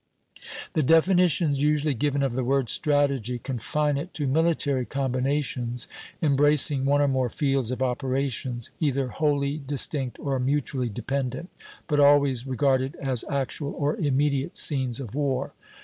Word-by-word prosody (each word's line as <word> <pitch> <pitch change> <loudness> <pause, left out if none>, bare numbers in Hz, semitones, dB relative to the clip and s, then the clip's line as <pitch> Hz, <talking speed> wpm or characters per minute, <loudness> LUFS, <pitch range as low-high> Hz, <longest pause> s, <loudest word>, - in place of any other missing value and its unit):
The 155 - +2
definitions 165 -1 +3
usually 150 0 +2
given 140 +2 0
of 135 -3 0
the 130 +1 -1
word 135 -1 0
"strategy" 140 -5 +1
confine 140 +4 -1
it 170 +6 -6
to 150 - 0
military 145 -2 +1
combinations 130 -2 -2 0.4
embracing 145 -1 +4
one 145 +1 +3
or 145 - +3
more 130 -2 0
fields 135 -1 0
of 130 +1 -2
operations, 130 -1 -2
either 140 -4 0
wholly 145 0 0
distinct 140 -2 -1
or 135 -2 -2
mutually 130 -1 -1
dependent, 135 - -4 0.3
but 150 -2 0
always 140 -3 +4
regarded 130 0 +1
as 130 -4 -2
actual 140 +1 -2
or 145 +1 0
immediate 140 0 0
scenes 130 -5 +1
of 120 -6 -7
war. 140 -2 -1
140 Hz, 135 wpm, -25 LUFS, 130-145 Hz, 0.4 s, embracing